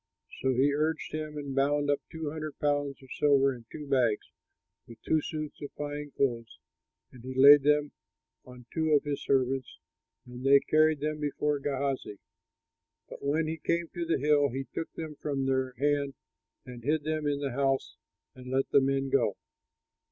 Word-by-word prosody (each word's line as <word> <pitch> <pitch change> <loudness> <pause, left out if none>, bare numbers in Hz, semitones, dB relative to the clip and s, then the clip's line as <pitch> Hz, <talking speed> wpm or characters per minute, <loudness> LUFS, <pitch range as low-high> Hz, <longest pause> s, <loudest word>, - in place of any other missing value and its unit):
So 130 - +1
he 140 +3 +3
urged 155 +2 -1
him 155 -1 -4
and 140 -2 -5
bound 145 +1 +2
up 145 - +1
two 160 -3 -4
hundred 155 -2 -6
pounds 145 -2 -1
of 130 - -16
silver 140 -2 +4
in 120 -2 -12
two 150 - -7
bags, 125 -6 +1 0.6
with 115 -1 -13
two 155 - +2
suits 155 0 -6
of 145 - -6
fine 145 0 -5
clothes, 120 -4 -1 0.5
and 125 -2 -14
laid 140 +2 +9
them 150 +1 +2 0.5
on 125 -1 -13
two 160 -1 +1
of 145 - +4
his 145 -2 -3
servants, 130 -1 0 0.5
and 125 0 -10
they 140 +1 +7
carried 155 0 +2
them 155 0 -2
before 150 0 -1
Gehazi. 135 -6 -2 0.9
But - - -10
when 150 +3 +1
he 160 +1 -3
came 170 +1 -1
to 175 - -4
the 165 0 +1
hill, 145 0 +3
he 135 +2 -4
took 165 - -4
them 155 -2 -7
from 140 -2 -1
their 130 -1 0
hand 140 0 0 0.5
and 120 -2 -10
hid 150 +3 +1
them 155 0 -2
in 145 -1 0
the 140 -2 -2
house 135 - 0 0.4
and 125 0 -11
let 135 +1 0
the 140 - +6
men 135 0 0
go. 120 -7 +2
145 Hz, 175 wpm, -29 LUFS, 135-150 Hz, 0.9 s, laid